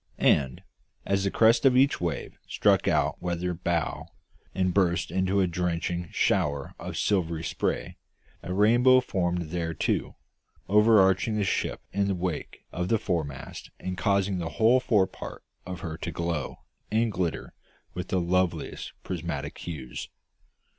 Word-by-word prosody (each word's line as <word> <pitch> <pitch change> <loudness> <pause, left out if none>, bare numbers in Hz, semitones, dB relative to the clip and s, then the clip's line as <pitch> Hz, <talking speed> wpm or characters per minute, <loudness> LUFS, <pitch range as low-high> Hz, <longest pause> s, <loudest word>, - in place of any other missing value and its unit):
And, 65 -3 +2 0.4
as 100 0 +1
the - - +2
crest 115 +3 +4
of 130 -2 +5
each 135 -4 +3
wave 85 -4 -3
struck - - +2
our - - +2
weather 90 0 -2
bow 85 -1 -2 0.5
and 95 -1 +1
burst 90 -2 +1
into 95 +1 +1
a - - +4
drenching 85 -1 -2
shower 75 -7 0
of - - -6
silvery 85 -5 0
spray, - - -2 0.4
a 90 - -6
rainbow 120 +6 +5
formed 90 -7 -2
there 85 -2 -2
too, - - -1 0.5
overarching 105 0 +4
the 105 - +1
ship 95 - -1
in 100 0 +1
the 100 - 0
wake 90 -3 -4
of 90 +1 -2
the 115 - +3
foremast 80 -10 -4
and 95 0 -4
causing 100 0 +1
the 80 -2 -3
whole 115 +4 +5
forepart 105 -7 -1 0.2
of 90 -1 -6
her 80 -2 -5
to - - -5
glow 85 -4 -3 0.3
and 110 +1 +1
glitter 90 -4 -3 0.4
with 90 - -5
the 95 - 0
loveliest 90 +1 -1
prismatic 80 -5 -4
hues. 70 -8 -6
90 Hz, 145 wpm, -27 LUFS, 85-100 Hz, 0.5 s, of